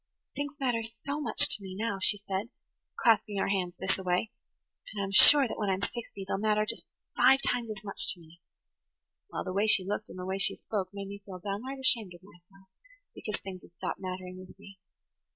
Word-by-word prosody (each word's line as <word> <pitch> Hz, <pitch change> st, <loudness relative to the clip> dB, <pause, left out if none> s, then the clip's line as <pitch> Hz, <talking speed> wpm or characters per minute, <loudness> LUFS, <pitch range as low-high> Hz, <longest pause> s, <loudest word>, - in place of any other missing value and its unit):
'Things 285 Hz, -1 st, -3 dB
matter 245 Hz, -4 st, 0 dB, 0.2 s
so 285 Hz, +2 st, -2 dB
much -, -, +2 dB
to -, -, -1 dB
me 190 Hz, -1 st, -8 dB
now,' 215 Hz, -2 st, -2 dB
she 205 Hz, -, +5 dB
says, 200 Hz, +1 st, -4 dB, 0.5 s
clasping 220 Hz, -3 st, +2 dB
her 195 Hz, -, 0 dB
hands 185 Hz, -3 st, -1 dB
[Page 190 Hz, 0 st, -1 dB
85] 190 Hz, -, -3 dB
thisaway, 180 Hz, +5 st, +1 dB, 0.6 s
'and 200 Hz, -2 st, -3 dB
I'm 195 Hz, -, -4 dB
sure 275 Hz, +7 st, +9 dB
that -, -, -6 dB
when 205 Hz, -2 st, 0 dB
I'm 190 Hz, +1 st, -1 dB
sixty 200 Hz, -4 st, -5 dB
they'll 195 Hz, -, -2 dB
matter 215 Hz, 0 st, +2 dB
just 230 Hz, +2 st, -4 dB, 0.3 s
five 260 Hz, +2 st, +6 dB
times 240 Hz, -2 st, -1 dB
as 210 Hz, -2 st, -6 dB
much 200 Hz, -, +2 dB
to -, -, -19 dB
me.' 165 Hz, +1 st, -18 dB, 0.9 s
Well, -, -, -4 dB
the 185 Hz, -, -5 dB
way 200 Hz, +3 st, +1 dB
she 195 Hz, -3 st, +5 dB
looked 205 Hz, +2 st, -3 dB
and -, -, -10 dB
the 180 Hz, -, -6 dB
way 190 Hz, +1 st, -3 dB
she -, -, +4 dB
spoke 195 Hz, -4 st, -4 dB
made 200 Hz, -1 st, -7 dB
me 200 Hz, +1 st, -9 dB
feel 190 Hz, -2 st, -9 dB
downright 205 Hz, +9 st, -5 dB
ashamed 230 Hz, -8 st, +1 dB
of 175 Hz, -, -16 dB
myself 190 Hz, +1 st, -20 dB, 0.5 s
because 210 Hz, -, -5 dB
things 185 Hz, -2 st, -8 dB
had -, -, -18 dB
stopped -, -, -5 dB
mattering 185 Hz, 0 st, -6 dB
with 185 Hz, 0 st, -13 dB
me. 200 Hz, -1 st, -15 dB
200 Hz, 215 wpm, -29 LUFS, 185-220 Hz, 0.9 s, sure